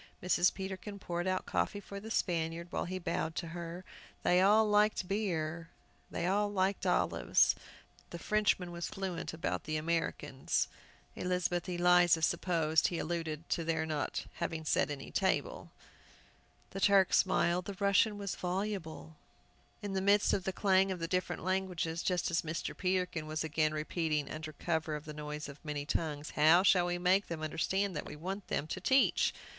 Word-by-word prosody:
Mrs. 180 Hz, 0 st, +3 dB
Peterkin 195 Hz, +1 st, -6 dB
poured 175 Hz, -2 st, -3 dB
out 185 Hz, 0 st, 0 dB
coffee 205 Hz, -, -1 dB
for 200 Hz, 0 st, -8 dB
the 220 Hz, +2 st, -9 dB
Spaniard, 170 Hz, -4 st, -1 dB
while -, -, -2 dB
he 185 Hz, +1 st, -4 dB
bowed 165 Hz, -2 st, -2 dB
to 170 Hz, -, -4 dB
her. 170 Hz, +2 st, -7 dB, 0.4 s
They 180 Hz, +1 st, +4 dB
all 215 Hz, +3 st, +5 dB
liked 210 Hz, -2 st, +3 dB
beer, 170 Hz, -5 st, -2 dB, 0.4 s
they 170 Hz, -, -3 dB
all 205 Hz, +3 st, +1 dB
liked 195 Hz, 0 st, 0 dB
olives. -, -, +3 dB, 0.6 s
The 170 Hz, -, -6 dB
Frenchman 195 Hz, -2 st, +1 dB
was 170 Hz, 0 st, -4 dB
fluent 190 Hz, -3 st, -4 dB
about 160 Hz, -1 st, -3 dB
"les 155 Hz, 0 st, -1 dB
moeurs 165 Hz, +1 st, 0 dB
Américaines." 130 Hz, -, -1 dB, 0.5 s
Elizabeth 180 Hz, 0 st, -1 dB
Eliza 175 Hz, -1 st, +4 dB
supposed 165 Hz, -1 st, +2 dB
he 175 Hz, -, -3 dB
alluded 165 Hz, -1 st, -3 dB
to 165 Hz, -, 0 dB
their 160 Hz, -1 st, 0 dB
not 155 Hz, -2 st, -2 dB
having 165 Hz, -2 st, -3 dB
set -, -, +2 dB
any 140 Hz, -2 st, -6 dB
table. -, -, -1 dB, 1.0 s
The 195 Hz, -, -5 dB
Turk 195 Hz, -2 st, +5 dB
smiled, 180 Hz, -1 st, +2 dB
the 200 Hz, -, -5 dB
Russian 200 Hz, +1 st, +3 dB
was 200 Hz, -2 st, -3 dB
voluble. 180 Hz, -4 st, -4 dB, 0.7 s
In 200 Hz, -1 st, -3 dB
the 190 Hz, -, 0 dB
midst 200 Hz, +1 st, +4 dB
of 185 Hz, -, 0 dB
the 190 Hz, -, 0 dB
clang 190 Hz, 0 st, +3 dB
of 185 Hz, -, -2 dB
the 165 Hz, -1 st, -3 dB
different 180 Hz, -1 st, -2 dB
languages, 180 Hz, -3 st, -1 dB
just 180 Hz, -2 st, 0 dB
as 170 Hz, -, +2 dB
Mr. 165 Hz, +1 st, -4 dB
Peterkin 180 Hz, -4 st, -1 dB
was 155 Hz, +1 st, -2 dB
again 155 Hz, 0 st, +1 dB
repeating, 155 Hz, -1 st, -1 dB
under 155 Hz, 0 st, -6 dB
cover 160 Hz, -1 st, -2 dB
of 150 Hz, +1 st, -7 dB
the 150 Hz, -, -7 dB
noise 150 Hz, 0 st, -6 dB
of 140 Hz, 0 st, -11 dB
many 150 Hz, -2 st, -4 dB
tongues, 150 Hz, 0 st, -2 dB
"How 160 Hz, +4 st, +5 dB
shall 180 Hz, -2 st, +4 dB
we 175 Hz, 0 st, -1 dB
make 185 Hz, +3 st, +2 dB
them 160 Hz, -2 st, -5 dB
understand 190 Hz, +5 st, -1 dB
that 150 Hz, -, -4 dB
we -, -, -7 dB
want 190 Hz, +6 st, -5 dB
them 145 Hz, -, -1 dB
to 185 Hz, +4 st, -5 dB
teach?" 265 Hz, +6 st, +3 dB
175 Hz, 170 wpm, -33 LUFS, 160-190 Hz, 1.0 s, all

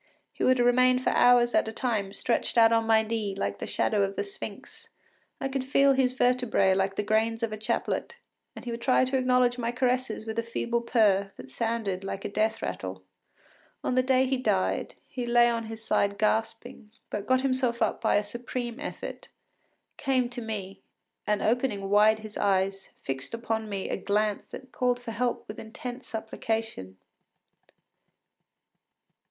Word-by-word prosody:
He -, -, -4 dB
would 255 Hz, 0 st, +4 dB
remain 250 Hz, +1 st, +4 dB
for 255 Hz, -, 0 dB
hours 245 Hz, -1 st, +5 dB
at -, -, +3 dB
a -, -, -3 dB
time 220 Hz, -4 st, -1 dB
stretched 240 Hz, +3 st, -1 dB
out 225 Hz, -1 st, +7 dB
on 225 Hz, -1 st, +2 dB
my 220 Hz, -1 st, +5 dB
knee 215 Hz, -3 st, -2 dB
like 100 Hz, -, -3 dB
the -, -, -5 dB
shadow 210 Hz, -2 st, +1 dB
of 195 Hz, 0 st, -1 dB
a -, -, 0 dB
sphinx; 400 Hz, -1 st, -9 dB, 0.5 s
I 270 Hz, -, -1 dB
could 270 Hz, -1 st, -2 dB
feel 275 Hz, +1 st, +4 dB
his 260 Hz, -1 st, +2 dB
vertebræ 245 Hz, -7 st, +2 dB
like 195 Hz, 0 st, 0 dB
the 210 Hz, -, -1 dB
grains 225 Hz, +2 st, +1 dB
of 225 Hz, -2 st, -1 dB
a -, -, -4 dB
chaplet, 215 Hz, -, -2 dB, 0.4 s
and -, -, -10 dB
he 240 Hz, -, -3 dB
would 235 Hz, 0 st, -5 dB
try 255 Hz, +1 st, +3 dB
to 260 Hz, +1 st, -2 dB
acknowledge 250 Hz, -1 st, +2 dB
my 235 Hz, 0 st, -1 dB
caresses 250 Hz, -3 st, -1 dB
with 220 Hz, 0 st, -3 dB
a -, -, +2 dB
feeble 235 Hz, +1 st, -2 dB
purr 205 Hz, -5 st, +2 dB
that 130 Hz, -, -11 dB
sounded 220 Hz, -, -2 dB
like 195 Hz, 0 st, -5 dB
a -, -, -2 dB
death 220 Hz, +2 st, 0 dB
rattle. 95 Hz, 0 st, -5 dB, 0.8 s
On -, -, 0 dB
the 255 Hz, -, +4 dB
day 260 Hz, 0 st, +3 dB
he 265 Hz, 0 st, 0 dB
died, 95 Hz, -, 0 dB
he 245 Hz, -2 st, -5 dB
lay 240 Hz, 0 st, +5 dB
on 230 Hz, -1 st, -1 dB
his 220 Hz, 0 st, -8 dB
side 200 Hz, -2 st, +1 dB
gasping, 220 Hz, 0 st, -1 dB, 0.2 s
but 205 Hz, -1 st, -4 dB
got 260 Hz, 0 st, +3 dB
himself 255 Hz, -3 st, 0 dB
up -, -, 0 dB
by 225 Hz, -, +2 dB
a 205 Hz, -, +3 dB
supreme 240 Hz, +3 st, -5 dB
effort, 295 Hz, -, -7 dB, 0.7 s
came 255 Hz, -3 st, +1 dB
to 245 Hz, 0 st, -6 dB
me, 205 Hz, -4 st, -6 dB, 0.5 s
and 210 Hz, -1 st, +1 dB
opening 220 Hz, -5 st, 0 dB
wide 210 Hz, +1 st, +5 dB
his 215 Hz, -1 st, -8 dB
eyes, 195 Hz, -1 st, 0 dB
fixed 135 Hz, +9 st, -4 dB
upon 225 Hz, -2 st, -3 dB
me 195 Hz, -2 st, -3 dB
a -, -, -2 dB
glance 205 Hz, +2 st, 0 dB
that 260 Hz, -1 st, -10 dB
called 245 Hz, -1 st, 0 dB
for 245 Hz, -2 st, -7 dB
help 240 Hz, +2 st, -2 dB
with 210 Hz, -, -8 dB
intense 245 Hz, +3 st, -7 dB
supplication. 220 Hz, -, -4 dB
225 Hz, 180 wpm, -27 LUFS, 210-250 Hz, 0.8 s, out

